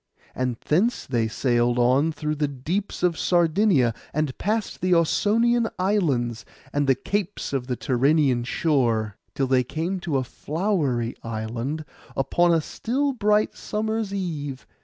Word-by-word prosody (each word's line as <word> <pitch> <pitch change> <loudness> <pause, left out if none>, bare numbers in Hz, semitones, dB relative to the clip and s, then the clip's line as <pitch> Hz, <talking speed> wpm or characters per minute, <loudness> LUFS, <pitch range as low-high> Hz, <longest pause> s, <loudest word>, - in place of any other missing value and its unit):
And 125 -2 -2
thence 200 +11 +1
they 120 -4 0
sailed 120 +1 +1
on 130 +6 +3
through 150 0 -3
the 150 -1 0
deeps 160 +10 -3
of 175 -2 +2
Sardinia, 170 - +3 0.2
and 150 -3 0
past 215 +2 -1
the 180 -1 +3
Ausonian 225 +8 +2
islands, 140 - 0 0.3
and 145 -1 +1
the 135 - +5
capes 200 -2 -3
of 130 -2 -1
the 125 - -1
Tyrrhenian 135 -1 +2
shore, 120 -7 0 0.2
till 135 - +1
they 130 -1 +3
came 165 +9 -3
to 160 -5 -1
a 130 - 0
flowery 145 - -1
island, 115 +7 -4 0.3
upon 175 +6 +3
a 165 -1 +3
still 270 - -1
bright 210 -2 +2
summer's 220 -1 -2
eve. 150 -9 -4
150 Hz, 140 wpm, -24 LUFS, 125-190 Hz, 0.3 s, the